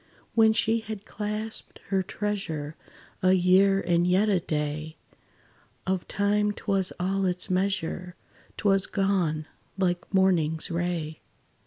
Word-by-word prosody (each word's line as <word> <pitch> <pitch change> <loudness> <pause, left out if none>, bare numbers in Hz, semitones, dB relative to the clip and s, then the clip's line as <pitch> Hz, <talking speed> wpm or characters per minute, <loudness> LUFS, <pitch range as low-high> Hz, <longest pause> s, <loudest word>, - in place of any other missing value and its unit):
When 220 -1 +6
she 225 +1 +2
had 220 -2 -7
clasped 210 +1 -5
her 195 -1 +2
treasure 175 -7 -3 0.5
A 185 0 +5
year 190 +2 +5
and 175 -1 +2
yet 190 +4 +3
a 195 -3 +3
day, 155 0 -3 0.9
Of 190 -1 -1
time 205 +1 +1
't - - -12
was 195 -3 +1
all 190 +2 0
its 180 +1 -2
measure 185 -1 -1 0.4
'T - - -1
was 195 -1 +3
gone, 180 -6 0 0.3
like 180 -2 -1
morning's 175 -5 +2
ray! 170 -2 -2
190 Hz, 130 wpm, -27 LUFS, 175-200 Hz, 0.9 s, When